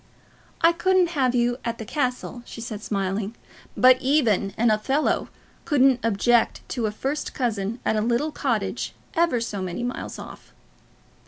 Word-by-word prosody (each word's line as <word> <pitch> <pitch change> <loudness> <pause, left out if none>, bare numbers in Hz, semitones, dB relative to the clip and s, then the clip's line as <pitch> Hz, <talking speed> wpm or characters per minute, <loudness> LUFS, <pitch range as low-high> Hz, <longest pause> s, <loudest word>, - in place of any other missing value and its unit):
"I 330 - +6
couldn't 360 +1 +2
have 260 -6 +1
you 245 +1 +1
at 235 0 -3
the 220 - -7
castle," 250 -1 -2
she 240 - -10
said, 220 -2 -6
smiling; 200 +1 -2 0.4
"but 255 0 +6
even 240 -8 +2
an 235 0 +3
Othello 265 +8 +1 0.3
couldn't 270 -4 +4
object 230 +2 +2
to 235 -4 -1
a - - -2
first 270 +7 -3
cousin 225 -2 -1
at - - +2
a 215 - +1
little 240 +7 0
cottage - - -2 0.2
ever 335 -8 +2
so 210 -4 -4
many 185 +5 -4
miles 245 +1 -4
off." - - -11
240 Hz, 155 wpm, -24 LUFS, 215-270 Hz, 0.4 s, I